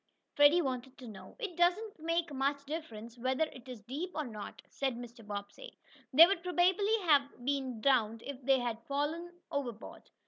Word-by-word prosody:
Freddie 290 +4 +6
wanted 260 0 -4
to 255 - -10
know. 210 -4 -11
"It 425 -8 -5
doesn't 360 +4 +1
make 330 0 -1
much 280 +1 -1
difference 235 -7 -7
whether 260 +5 +1
it 260 -4 -7
is 245 -4 -8
deep 280 - -5
or 305 - -1
not," 215 -4 -8
said 265 -3 -2
Mr. 240 -1 -10
Bobbsey, 205 - -8 0.3
"they 310 +5 +10
would 380 -1 0
probably 370 +4 +2
have 280 -6 +2
been 265 -4 -1
drowned 230 -4 +2
if 280 -1 -7
they 270 +1 +4
had 240 -2 -3
fallen 305 +5 -2 0.2
overboard. 245 -6 -5
275 Hz, 170 wpm, -32 LUFS, 245-335 Hz, 0.3 s, they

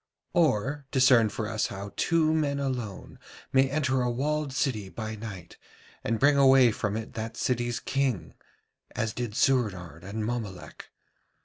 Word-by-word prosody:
Or 140 - +1
discern 125 -5 +5
for 110 +1 -4
us 110 -1 -1
how 100 0 -7
two 160 -2 +2
men 145 -3 0
alone 125 -8 -4 0.3
may 135 0 +4
enter 135 -3 +1
a 125 - +1
walled 145 +4 -1
city 115 -7 -1
by 110 +1 -5
night, 100 -6 -9 0.5
and 115 - 0
bring 145 0 +4
away 135 -3 +6
from 105 0 -2
it 110 - -6
that 115 +1 -5
city's 120 -1 -1
king, 135 -9 -1 0.6
as 110 0 -1
did 120 -4 -4
Soorenard 95 -12 0
and 105 +3 -4
Mommolek. 110 -6 -6
120 Hz, 145 wpm, -28 LUFS, 110-135 Hz, 0.6 s, away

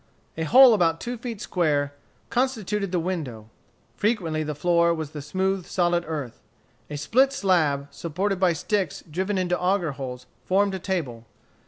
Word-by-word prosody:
A 160 - -2
hole 255 - +8
about 165 -5 +2
two 245 +1 -4
feet 230 -3 -6
square 145 -5 0 0.4
constituted 215 -6 -1
the 180 - +1
window. 140 -12 -4 0.4
Frequently 180 -8 0
the 150 -1 -3
floor 170 +2 +3
was 155 -2 -5
the 150 - -6
smooth, 190 +5 -1
solid 175 -1 +1
earth. 145 -7 -5 0.5
A 150 - -5
split 255 - +3
slab 160 - +1
supported 185 +4 -2
by 185 -2 +3
sticks 190 +1 -2
driven 190 +5 -1
into 180 -1 0
auger 180 -3 +1
holes, 130 -2 -7 0.2
formed 195 +1 +2
a 190 - -3
table. 135 - -3
175 Hz, 155 wpm, -25 LUFS, 150-195 Hz, 0.5 s, hole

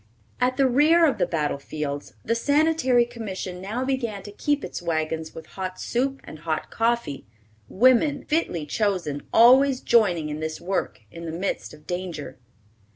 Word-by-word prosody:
At 250 +1 +1
the 275 - +4
rear 305 +7 +5
of 265 -9 +1
the 180 - +2
battle 150 -4 -1
fields 145 0 -5
the - - +1
Sanitary 285 -1 +3
Commission 190 -6 -6
now 225 +7 -3
began 235 -7 -2
to 205 - -9
keep 290 +7 -1
its - - -6
wagons 160 -1 -2
with 160 - -8
hot 185 -1 -6
soup 270 +3 -1
and 155 - -10
hot 155 0 -3
coffee, 230 - -1 0.4
women, 255 +6 +3
fitly 295 - -1
chosen, 175 -6 -1
always 255 +3 +6
joining 180 -12 +2
in 150 0 -4
this 155 0 -4
work, 185 -8 -3
in 170 0 -8
the 160 - -4
midst 180 +4 -3
of 150 0 -15
danger. 175 -7 -5
200 Hz, 160 wpm, -24 LUFS, 160-255 Hz, 0.4 s, always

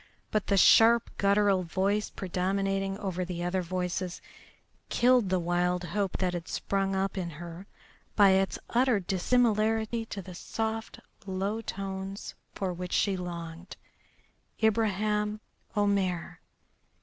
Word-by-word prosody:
But 215 -2 0
the 200 - +2
sharp, 230 +4 +6
guttural 200 -1 +3
voice 195 +4 0
predominating 195 +1 -1
over 185 -3 -3
the 175 -1 -4
other 180 +1 0
voices 180 0 -3 0.7
killed 245 -4 +4
the 185 - +2
wild 175 +1 0
hope 195 +1 -2
that 185 -1 0
had 175 -1 -5
sprung 195 -1 -1
up 195 +1 -1
in 175 -2 -3
her 170 +4 -9 0.5
by 200 -2 +7
its 190 0 +2
utter 245 -2 +3
dissimilarity 220 +3 +1
to 195 -3 -6
the 185 - -9
soft 220 +4 -4 0.3
low 195 +4 -2
tones 195 -1 -5 0.2
for 190 -2 -2
which 180 0 -5
she 200 -2 +2
longed. 170 -1 -7 0.9
Ibraheim 210 -1 +1 0.4
Omair! 195 -4 0
195 Hz, 125 wpm, -29 LUFS, 180-210 Hz, 0.9 s, by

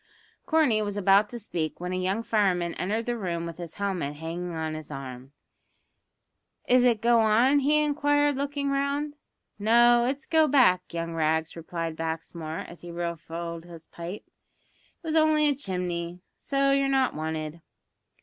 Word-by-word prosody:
Corney 300 -10 +3
was 205 -1 -3
about 200 +1 +4
to 240 - -6
speak, 170 -8 -4
when 180 +1 -4
a - - -1
young 190 +5 -1
fireman 185 -7 +1
entered 215 +5 -2
the 240 - -1
room 175 -6 -3
with 170 0 -7
his 170 -2 -7
helmet 185 -8 -2
hanging 165 +3 -5
on 160 -1 -3
his 155 -1 -7
arm. 135 -2 -8 1.4
"Is 250 0 +5
it 235 -3 +2
go 235 0 +5
on?" 230 +6 +4
he 300 +2 +3
inquired, 290 -1 +2
looking 280 0 -2
round. 280 +2 -1 0.4
"No, 235 +3 +5
it's 275 +2 -3
go 320 -1 +4
back, 240 -11 +4
young 165 0 -4
Rags," 160 0 0
replied 165 -1 -4
Baxmore, 160 0 -4
as 170 - -12
he 175 - -9
refilled 170 0 -5
his 165 -2 -12
pipe; 175 +5 -8
"it - - -39
was 320 0 -1
only 310 -1 +4
a 290 - +3
chimney, 180 -7 -4
so 275 0 +1
you're 275 0 +2
not 265 -1 +2
wanted." 155 +1 -4
190 Hz, 160 wpm, -27 LUFS, 165-270 Hz, 1.4 s, Is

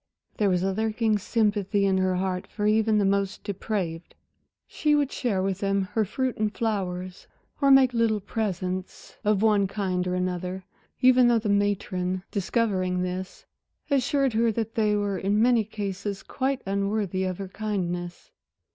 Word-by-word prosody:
There 205 -2 +2
was 180 -1 +1
a 195 0 0
lurking 220 0 0
sympathy 205 -2 +1
in 190 -1 +2
her 185 0 +1
heart 185 0 -2
for 210 - -4
even 215 0 +3
the 205 - +2
most 195 0 0
depraved. 185 -4 -4 0.5
She 300 -1 +1
would 285 -2 +1
share 205 -8 -1
with 195 -1 -1
them 195 -1 +1
her 220 -1 +2
fruit 255 +5 -2
and 215 -1 0
flowers, 185 -5 -3 0.3
or 275 - +4
make 265 -2 +6
little 230 -2 +2
presents 185 -3 -4
of 210 0 +2
one 210 -3 +4
kind 185 -2 -2
or 180 - -1
another, 180 +1 -3 0.4
even 255 -1 +6
though 240 -1 +4
the 220 -1 -2
matron, 190 -2 0
discovering 185 -3 0
this 185 +1 -5 0.5
assured 275 -1 +2
her 230 +1 +2
that 225 0 -3
they 215 -2 +2
were 205 -2 -1
in 200 +2 +1
many 235 0 +4
cases 200 -1 -5
quite 270 0 -2
unworthy 200 -1 -1
of 185 -1 -2
her 195 -1 -6
kindness. 180 -4 -4
200 Hz, 160 wpm, -26 LUFS, 185-220 Hz, 0.5 s, make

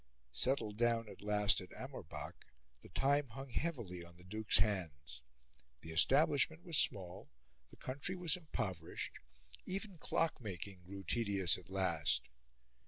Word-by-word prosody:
Settled 105 - +1
down 115 -1 +2
at - - -11
last 105 -1 +3
at 90 - -10
Amorbach, - - -7 0.5
the - - -13
time 140 +7 +2
hung 135 +3 -8
heavily 115 - -2
on 85 0 -14
the 90 - -15
Duke's 110 +4 +2
hands. 80 - -1 0.6
The 80 - -8
establishment 145 - +4
was 165 -6 +4
small, 95 -4 +1 0.4
the - - -16
country 140 +8 -3
was 180 -2 +2
impoverished; 95 - -4 0.5
even 195 -2 -3
clock 165 -1 0
making 95 -2 -6
grew 95 0 -7
tedious 100 -6 +3
at 90 - -17
last. 85 -9 +1
105 Hz, 135 wpm, -37 LUFS, 90-140 Hz, 0.6 s, establishment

